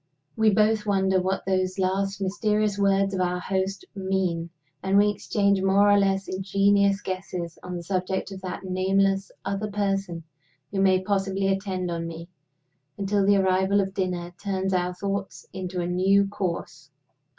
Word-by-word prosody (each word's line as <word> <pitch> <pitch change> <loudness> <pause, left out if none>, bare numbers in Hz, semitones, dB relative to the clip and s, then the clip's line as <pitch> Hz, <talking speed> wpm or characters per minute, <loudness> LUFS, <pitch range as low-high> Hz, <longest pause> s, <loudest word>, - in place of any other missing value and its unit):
We 220 -1 +4
both 215 +1 +2
wonder 190 -2 +2
what 190 +1 -2
those 185 0 0
last 195 +1 -1
mysterious 210 +1 0
words 195 0 +2
of 185 - -1
our 180 0 0
host 190 +1 -2
mean; 190 -4 -1 0.3
and 190 +1 +2
we 205 +1 +5
exchange 200 -1 +1
more 200 +2 +4
or 205 - +6
less 195 -1 +1
ingenious 200 +1 +2
guesses 180 -3 -5
on 180 0 -6
the 175 - -5
subject 190 +2 -2
of 190 -1 -8
that 185 0 -6
nameless 195 +1 +1
"other 200 +2 -2
person" 195 -4 -2 0.5
who 195 -1 0
may 190 -1 +3
possibly 195 -1 0
attend 190 -2 -2
on 165 0 -3
me 165 +1 -8 0.7
until 200 0 +1
the 200 +1 +4
arrival 190 +1 +2
of 195 -1 -1
dinner 180 -2 -3
turns 190 -1 -1
our 180 0 0
thoughts 200 +1 -4
into 185 -1 -4
a - - -2
new 190 +3 +3
course. 170 -6 -4
195 Hz, 160 wpm, -25 LUFS, 185-200 Hz, 0.7 s, or